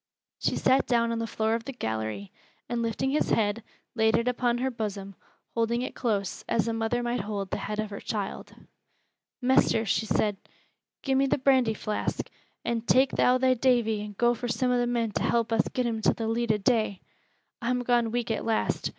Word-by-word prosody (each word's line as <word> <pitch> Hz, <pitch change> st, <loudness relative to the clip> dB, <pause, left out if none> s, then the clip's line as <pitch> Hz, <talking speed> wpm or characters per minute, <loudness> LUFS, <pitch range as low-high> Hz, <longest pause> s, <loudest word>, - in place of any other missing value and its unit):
She -, -, 0 dB
sat 265 Hz, +1 st, +3 dB
down 235 Hz, -1 st, +2 dB
upon 230 Hz, -, -1 dB
the 230 Hz, -, -2 dB
floor 220 Hz, 0 st, 0 dB
of 230 Hz, 0 st, -2 dB
the -, -, -4 dB
gallery, 110 Hz, -, -4 dB, 0.4 s
and 240 Hz, -1 st, -2 dB
lifting 230 Hz, +3 st, -1 dB
his 300 Hz, -, +1 dB
head, 215 Hz, 0 st, +1 dB, 0.3 s
laid 220 Hz, -1 st, +3 dB
it 235 Hz, -, -1 dB
upon 245 Hz, -1 st, +1 dB
her 260 Hz, +2 st, -1 dB
bosom, 200 Hz, -4 st, -5 dB, 0.4 s
holding 235 Hz, +1 st, 0 dB
it -, -, -4 dB
close, 205 Hz, -6 st, -2 dB
as 230 Hz, -1 st, +1 dB
a 230 Hz, -, 0 dB
mother 225 Hz, +2 st, -1 dB
might 240 Hz, +1 st, -1 dB
hold 200 Hz, -1 st, -4 dB
the -, -, -1 dB
head 210 Hz, -, -4 dB
of 215 Hz, -1 st, -3 dB
her 200 Hz, -, -5 dB
child. 205 Hz, -3 st, -5 dB, 0.9 s
"Mester," 245 Hz, -3 st, +3 dB
she 220 Hz, +2 st, 0 dB
said, 210 Hz, -2 st, +1 dB, 0.7 s
"gi' 270 Hz, -, 0 dB
me 270 Hz, +1 st, +3 dB
th' 265 Hz, 0 st, 0 dB
brandy 255 Hz, -5 st, +4 dB
flask, 210 Hz, 0 st, -3 dB, 0.3 s
and 235 Hz, -1 st, -2 dB
tak' 260 Hz, +1 st, +5 dB
thou 250 Hz, +1 st, +3 dB
thy 255 Hz, 0 st, +3 dB
Davy 235 Hz, -4 st, +2 dB
an' 210 Hz, -1 st, -7 dB
go 240 Hz, 0 st, +3 dB
fur 245 Hz, +1 st, -4 dB
some 245 Hz, +2 st, 0 dB
o' 245 Hz, -, +2 dB
the 240 Hz, -, +1 dB
men 235 Hz, -2 st, 0 dB
to -, -, -2 dB
help 230 Hz, -1 st, +1 dB
us 225 Hz, -, +2 dB
get 250 Hz, -, -1 dB
him 225 Hz, -2 st, -1 dB
to -, -, +3 dB
th' -, -, -8 dB
leet 230 Hz, 0 st, +1 dB
o' 215 Hz, -, +2 dB
day. 215 Hz, -2 st, +1 dB, 0.6 s
I'm 250 Hz, +1 st, 0 dB
gone 240 Hz, -2 st, +2 dB
weak 235 Hz, 0 st, -2 dB
at 220 Hz, -, -2 dB
last. 225 Hz, -1 st, 0 dB
230 Hz, 210 wpm, -27 LUFS, 215-245 Hz, 0.9 s, tak